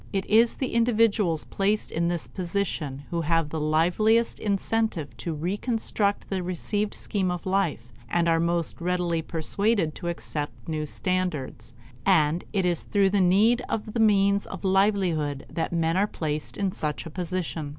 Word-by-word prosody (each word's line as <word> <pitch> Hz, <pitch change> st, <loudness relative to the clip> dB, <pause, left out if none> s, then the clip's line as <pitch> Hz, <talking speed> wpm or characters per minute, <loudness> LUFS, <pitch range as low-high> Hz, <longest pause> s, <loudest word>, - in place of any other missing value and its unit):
It 195 Hz, -2 st, -1 dB
is 225 Hz, +2 st, +4 dB
the 260 Hz, -, -3 dB
individuals 225 Hz, -8 st, +2 dB
placed 205 Hz, +2 st, 0 dB
in 170 Hz, +1 st, 0 dB
this 170 Hz, -1 st, -2 dB
position 170 Hz, -7 st, -3 dB
who 170 Hz, -1 st, 0 dB
have 165 Hz, -1 st, +1 dB
the 160 Hz, -, -3 dB
liveliest 180 Hz, +10 st, +2 dB
incentive 200 Hz, -, -1 dB
to 170 Hz, -, -4 dB
reconstruct 205 Hz, +4 st, -1 dB
the 190 Hz, -2 st, -2 dB
received 205 Hz, +4 st, -2 dB
scheme 190 Hz, -3 st, -1 dB
of 180 Hz, -1 st, -4 dB
life 175 Hz, -, -1 dB, 0.2 s
and 170 Hz, -1 st, +1 dB
are 165 Hz, 0 st, +3 dB
most 170 Hz, 0 st, 0 dB
readily 175 Hz, -1 st, 0 dB
persuaded 170 Hz, +2 st, 0 dB
to 175 Hz, -, -7 dB
accept 150 Hz, -3 st, -5 dB
new 155 Hz, -1 st, -2 dB
standards; 150 Hz, -10 st, -2 dB, 0.3 s
and 165 Hz, -3 st, +3 dB
it 195 Hz, -3 st, 0 dB
is 175 Hz, -2 st, +2 dB
through 200 Hz, -2 st, +2 dB
the 200 Hz, -1 st, +3 dB
need 210 Hz, +7 st, +4 dB
of 215 Hz, -1 st, -3 dB
the 235 Hz, -, -1 dB
means 200 Hz, -2 st, +3 dB
of -, -, -8 dB
livelihood 190 Hz, -7 st, +1 dB
that 165 Hz, -, -2 dB
men 165 Hz, -1 st, +1 dB
are 200 Hz, +2 st, +3 dB
placed 155 Hz, -5 st, -3 dB
in 195 Hz, -2 st, 0 dB
such 150 Hz, -3 st, -3 dB
a 165 Hz, -, -7 dB
position. 175 Hz, -3 st, -3 dB
180 Hz, 160 wpm, -26 LUFS, 160-200 Hz, 0.3 s, is